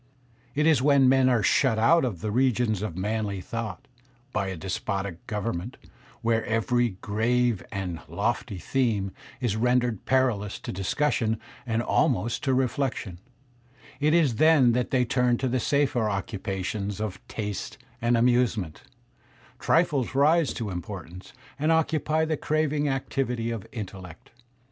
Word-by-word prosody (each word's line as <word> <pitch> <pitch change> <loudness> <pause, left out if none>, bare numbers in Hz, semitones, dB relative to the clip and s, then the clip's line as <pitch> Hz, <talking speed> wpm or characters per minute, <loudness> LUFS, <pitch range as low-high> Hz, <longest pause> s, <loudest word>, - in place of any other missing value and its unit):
"It 150 +1 +2
is 155 -6 +4
when 140 -1 +5
men 130 0 +5
are 120 -4 +2
shut 115 +2 +3
out 160 +9 +4
of 105 -10 -2
the 105 - -2
regions 120 -4 +1
of 105 -5 -4
manly 105 0 -2
thought, 110 0 -5 0.5
by 100 -2 0
a 95 - -3
despotic 95 0 -4
government; 105 0 -3 0.5
when 115 0 +2
every 115 -1 +1
grave 115 +1 +1
and 90 -4 -4
lofty 100 - -2
theme 105 -3 0 0.3
is 120 -5 0
rendered 125 -1 +1
perilous 120 -6 +1
to - - -5
discussion 110 +3 0 0.3
and 115 0 0
almost 120 - +1
to 135 - +2
reflection; 125 -8 -1 0.8
it 150 +2 +3
is 145 -10 +3
then 155 -5 +5
that 125 +1 0
they 125 -2 +2
turn 125 0 +2
to 130 - -1
the 130 +1 0
safer 130 -4 +1
occupa 100 -2 -3
tions 100 0 -3
of 100 -3 -4
taste 105 -3 -5 0.2
and 120 +1 +3
amusement; 115 -8 +1 0.8
trifles 145 -7 +1
rise 150 +2 +4
to 110 -5 -3
importance, 90 +1 -7 0.3
and 155 +3 +2
occupy 160 -1 +1
the 160 0 0
craving 150 -1 0
activity 125 -3 -2
of 115 -4 -5
intellect. 95 -6 -8
115 Hz, 140 wpm, -26 LUFS, 100-130 Hz, 0.8 s, when